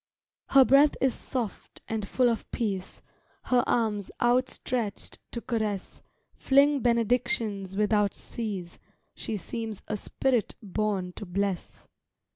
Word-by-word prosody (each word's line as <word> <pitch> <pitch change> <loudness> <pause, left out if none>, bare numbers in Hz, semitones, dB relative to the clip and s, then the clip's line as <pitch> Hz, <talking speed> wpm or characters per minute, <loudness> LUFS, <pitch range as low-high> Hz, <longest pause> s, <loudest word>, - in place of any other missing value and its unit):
Her 270 -1 +7
breath 280 +3 +6
is 265 -2 +2
soft, 240 -7 -5
and 220 -2 -3
full 255 +3 +3
of 230 -2 -1
peace, 195 -5 -3 0.4
Her 250 -1 +3
arms 215 -4 0
outstretchéd 240 -2 0
to 235 - -4
caress 215 -5 -3 0.3
Fling 280 +1 +4
benedictions 230 -5 0
without 210 -1 +2
cease, 195 -7 -4 0.3
She 215 - -4
seems 220 +2 -5
a 215 - -1
spirit 245 +2 0
borne 200 -2 -1
to 210 - -6
bless. 195 0 -3
220 Hz, 115 wpm, -28 LUFS, 200-245 Hz, 0.4 s, Her